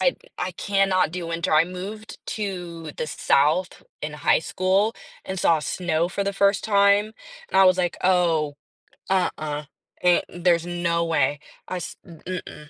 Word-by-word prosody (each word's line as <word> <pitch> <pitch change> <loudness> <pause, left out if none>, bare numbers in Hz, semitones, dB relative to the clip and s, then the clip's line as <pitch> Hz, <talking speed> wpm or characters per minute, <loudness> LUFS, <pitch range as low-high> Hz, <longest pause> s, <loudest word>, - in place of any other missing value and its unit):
I - - +2 0.2
I - - -2
cannot 195 -4 +1
do 180 -1 -4
winter, 165 -1 -2
I 155 +1 +6
moved 195 +5 -7
to 175 -6 -5
the - - -3
South 155 +4 +1 0.2
in 150 0 -4
high 150 - +3
school 190 +6 +1 0.3
and 190 0 -4
saw 165 -2 +3
snow 170 +1 -1
for 200 +2 -2
the 200 - -1
first 200 0 +2
time, 200 0 +4 0.4
and 190 - +4
I - - +8
was 185 0 +5
like, 175 -2 0
"Oh, 170 -5 +2 0.6
uh-uh, 155 -5 -1 0.4
eh, 175 -1 +5
there's 175 -1 +1
no 170 -1 0
way." 145 -3 +1 0.3
I 185 - -3
s 175 - -7
m 170 -3 -13
mm-mm. 160 -4 -7
180 Hz, 160 wpm, -24 LUFS, 165-190 Hz, 0.6 s, I